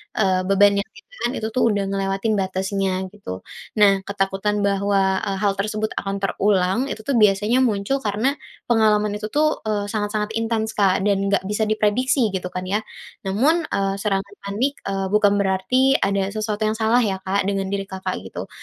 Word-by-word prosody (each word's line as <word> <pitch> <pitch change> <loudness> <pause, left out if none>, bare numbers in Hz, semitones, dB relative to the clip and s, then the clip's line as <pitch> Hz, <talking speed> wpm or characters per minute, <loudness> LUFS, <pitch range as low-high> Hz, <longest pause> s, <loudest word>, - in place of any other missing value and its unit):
eee, 185 -3 +1
beban 200 +1 +4
yang 200 - -1
ditahan 230 +2 -5
itu 220 - -2
tuh 255 - +3
udah 200 -1 0
ngelewatin 195 +2 -1
batasnya 190 0 -1 0.2
gitu. 95 - -7 0.4
Nah 195 -2 +5
ketakutan 200 +1 -1
bahwa, 195 -1 +1
eee, 195 -1 -2
hal 200 -1 +2
tersebut 215 +2 -1
akan 195 0 -3
terulang 195 0 +1
itu - - -5
tuh 280 - +1
biasanya 210 +3 +3
muncul 215 +2 0
karena 220 +7 0 0.3
pengalaman 210 -3 +3
itu 210 +1 -4
tuh, 305 +1 +1
eee, 205 -2 -1
sangat-sangat 210 0 -2
intens 225 -1 -1
Kak 195 -3 +3
dan 200 -1 +1
nggak 200 - +2
bisa 210 +2 0
diprediksi 220 +4 +2
gitu 180 -1 -3
kan 185 0 -5
ya. 205 +3 0 0.4
Namun, 265 - +2
eee, 195 0 0
serangan 200 -1 -1
panik, 225 +8 -1
eee, 195 -1 -2
bukan 205 -1 +4
berarti 200 +8 +2
ada 195 -1 +1
sesuatu 215 0 -2
yang 215 - +1
salah 220 +2 +2
ya 190 -2 -2
Kak 195 +1 0
dengan 195 -1 -1
diri 200 0 -2
Kakak 190 -1 -4
gitu, - - -7
205 Hz, 175 wpm, -22 LUFS, 195-215 Hz, 0.4 s, Nah